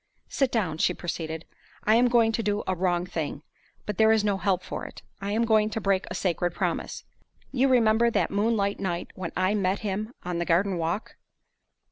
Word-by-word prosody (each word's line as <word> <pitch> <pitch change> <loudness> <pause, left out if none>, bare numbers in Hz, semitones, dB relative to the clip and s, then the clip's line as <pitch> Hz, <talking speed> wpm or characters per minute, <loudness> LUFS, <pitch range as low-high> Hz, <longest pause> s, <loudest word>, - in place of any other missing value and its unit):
"Sit 270 -3 +1
down," 180 -9 -1
she 180 - +2
proceeded. 160 -2 -4 0.4
"I 215 - +4
am 240 +2 +5
going 235 -2 +4
to 225 - -1
do 205 -1 -1
a 190 - 0
wrong 175 -1 0
thing; 155 -5 -4 0.4
but 210 -1 -4
there 220 0 +6
is 220 -1 +3
no 205 -2 +1
help 190 -2 0
for - - -5
it. - - -10 0.2
I 200 +1 -3
am 225 +3 +2
going 215 -1 +3
to 220 - -3
break 195 -2 +1
a - - -5
sacred 175 -1 -1
promise. - - -2 0.5
You 270 0 +3
remember 235 -2 +4
that - - 0
moonlight 205 -1 +1
night 175 -3 -3
when 185 -3 -5
I 185 +2 +2
met 195 -2 0
him 215 +3 -3
on 175 -1 -2
the 170 - -1
garden 180 +2 +2
walk?" 170 +6 -3
200 Hz, 200 wpm, -27 LUFS, 180-220 Hz, 0.5 s, there